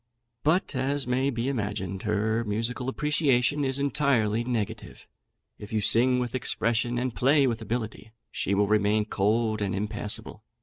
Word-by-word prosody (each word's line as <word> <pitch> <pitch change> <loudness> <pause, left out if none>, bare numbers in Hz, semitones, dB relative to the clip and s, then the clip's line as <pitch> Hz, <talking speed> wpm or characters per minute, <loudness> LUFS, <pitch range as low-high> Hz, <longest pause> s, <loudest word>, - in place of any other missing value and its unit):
But, 160 +4 +1
as 135 +2 0
may 130 +2 +1
be 120 -1 -2
imagined, 100 -7 -3
her 110 +2 0
musical 115 +4 -2
appreciation 145 -1 +1
is 135 0 +1
entirely 140 -6 +1
negative; 120 -4 -4 0.5
if 105 - -10
you 110 - +1
sing 125 +5 +3
with 125 -2 -2
expression, 120 -1 0
and 125 0 -1
play 140 +4 +3
with 115 -3 -1
ability, 110 -1 -4 0.2
she 100 - -1
will 100 +1 +3
remain 105 +1 +2
cold 110 +2 0
and 100 -2 -1
impassible. 105 +1 -4
115 Hz, 145 wpm, -27 LUFS, 105-130 Hz, 0.5 s, sing